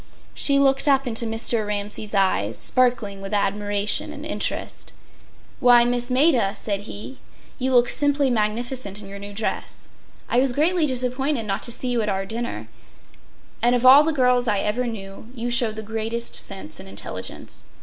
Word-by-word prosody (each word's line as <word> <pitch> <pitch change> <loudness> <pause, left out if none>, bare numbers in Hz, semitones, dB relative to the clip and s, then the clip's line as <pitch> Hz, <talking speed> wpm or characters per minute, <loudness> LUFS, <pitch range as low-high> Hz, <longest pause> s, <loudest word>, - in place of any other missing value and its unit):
She 280 -1 +3
looked 275 0 +3
up 275 -1 +3
into 230 -1 +3
Mr. 225 0 0
Ramsay’s 210 0 -4
eyes, 150 - +1
sparkling 235 -6 +1
with 195 +2 -4
admiration 205 0 0
and - - -8
interest. - - -4 0.7
“Why, 240 -1 +6
Miss 245 0 -1
Maida,” 255 -6 +3
said 205 0 -4
he, 215 +6 -8 0.4
“you 260 +1 0
look 240 0 +5
simply 285 -1 +2
magnificent 225 -1 -2
in 205 - -10
your 200 0 -9
new 200 0 -8
dress. 210 +2 -5 0.4
I 240 - +2
was 260 -1 +2
greatly 320 +3 +2
disappointed 255 0 -1
not 195 -1 -2
to 235 - 0
see 250 +2 -2
you 240 -2 +1
at 210 - -1
our 195 -1 -2
dinner. 220 - -5 0.9
And 240 +2 +3
of 245 +1 0
all 265 +3 +9
the 320 - +1
girls 250 -4 +2
I 210 -2 +2
ever 240 +4 -1
knew, 200 -1 -8
you 240 0 -3
show 240 -2 +2
the 220 0 -7
greatest 225 +2 -3
sense 190 - -3
and 95 - -10
intelligence. 100 - -7
235 Hz, 170 wpm, -23 LUFS, 205-255 Hz, 0.9 s, all